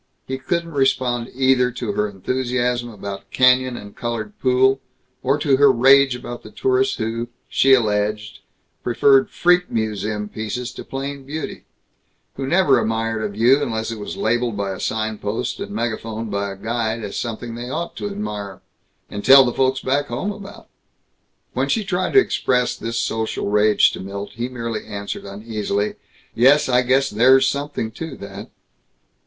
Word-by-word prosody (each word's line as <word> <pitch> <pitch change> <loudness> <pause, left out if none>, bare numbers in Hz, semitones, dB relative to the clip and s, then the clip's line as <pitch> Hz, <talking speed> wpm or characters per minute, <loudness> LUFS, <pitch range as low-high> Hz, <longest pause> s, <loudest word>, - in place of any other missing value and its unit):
He 130 0 -4
couldn't 170 +5 -2
respond 130 -4 +1
either 130 -1 +3
to 120 -3 -3
her 105 +1 -1
enthusiasm 125 +3 -1
about 100 -2 -8
canyon 130 -1 +3
and 100 0 -11
colored 115 -3 -4
pool 130 +1 +3 0.4
or 135 +3 +1
to 145 -2 +2
her 140 0 +6
rage 135 +1 +5
about 120 -1 -7
the - - -12
tourists 395 0 +1
who, 115 +1 -3 0.2
she 135 0 +5
alleged, 105 -2 -1 0.4
preferred 135 +2 +4
freak 180 0 +2
museum 105 -1 -2
pieces 110 +4 -5
to - - -9
plain 140 +1 -5
beauty; 150 +3 -6 0.7
who 135 0 -5
never 145 -7 +4
admired 115 0 -1
a 105 - -1
view 120 +7 +3
unless 110 -3 -2
it 115 - -6
was 105 - -6
labeled 120 -1 0
by 100 -1 -2
a 95 - -6
signpost 110 -1 -2
and 205 - -5
megaphoned 115 - -3
by 100 0 -1
a - - -7
guide 115 +1 -2
as 100 - -6
something 115 0 -4
they 120 +1 -6
ought 165 +5 -4
to 205 - -3
admire 105 - -6 0.4
and 100 0 -6
tell 135 0 +8
the 120 - -1
Folks 130 0 +1
Back 145 +2 0
Home 130 +12 -3
about. 200 -1 -11 0.9
When - - -1
she 225 - +1
tried 185 -1 -1
to 405 - +8
express 125 - +1
this 115 0 -4
social 110 -2 -2
rage 105 0 +4
to - - -7
Milt 100 +1 -6
he 120 +3 -4
merely 115 -3 -4
answered 100 -2 -6
uneasily, 105 0 -3 0.4
"Yes, 135 +5 +5
I 125 -1 +4
guess 135 +2 +2
there's 130 +5 +5
something 140 -5 -3
to 155 +3 -7
that." 100 +1 -9
120 Hz, 165 wpm, -21 LUFS, 110-135 Hz, 0.9 s, tell